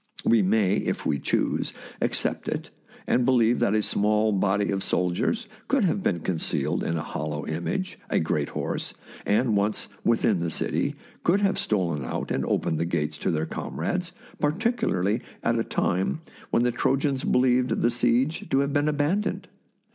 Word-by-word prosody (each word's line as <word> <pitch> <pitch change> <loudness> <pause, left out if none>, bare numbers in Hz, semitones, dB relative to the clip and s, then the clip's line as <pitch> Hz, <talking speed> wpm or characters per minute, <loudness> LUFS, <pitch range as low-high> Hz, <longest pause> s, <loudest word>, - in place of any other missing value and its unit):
We 115 -2 +5
may, 100 0 +3
if - - -2
we 70 - +1
choose, - - 0 0.3
ac - - +1
cept - - -2
it, - - -3 0.3
and 125 - +2
believe 120 -2 +3
that 115 -3 +2
a 105 - +2
small 105 +2 +2
body 100 0 +1
of 95 -1 -1
sol 90 0 +1
diers 225 - -1 0.2
could 275 -4 +2
have 195 +2 +1
been 85 - 0
concealed 85 -2 -1
in 85 - -1
a 80 - -3
hollow 75 0 -4
image, 135 - -3
a - - +2
great 75 -2 0
horse, - - -3 0.3
and 110 +2 +3
once 100 +1 0
within 115 -4 +2
the 85 0 -1
city, - - -1 0.3
could 190 +4 +3
have 195 -1 +2
stolen 85 -9 0
out 65 - -4
and - - 0
opened 80 - 0
the 85 - +1
gates 75 -3 -2
to - - -1
their 80 -1 0
comrades, 180 - -3 0.3
particularly 150 - +1 0.2
at 115 0 +2
a - - +1
time 95 - 0 0.3
when 120 - +2
the 125 - +2
Trojans 135 +2 +1
believed 125 0 +3
the 120 - +4
siege 120 +6 +1
to 135 - +3
have 140 0 -1
been 145 0 +2
abandoned. 150 +8 0
110 Hz, 175 wpm, -26 LUFS, 90-140 Hz, 0.3 s, We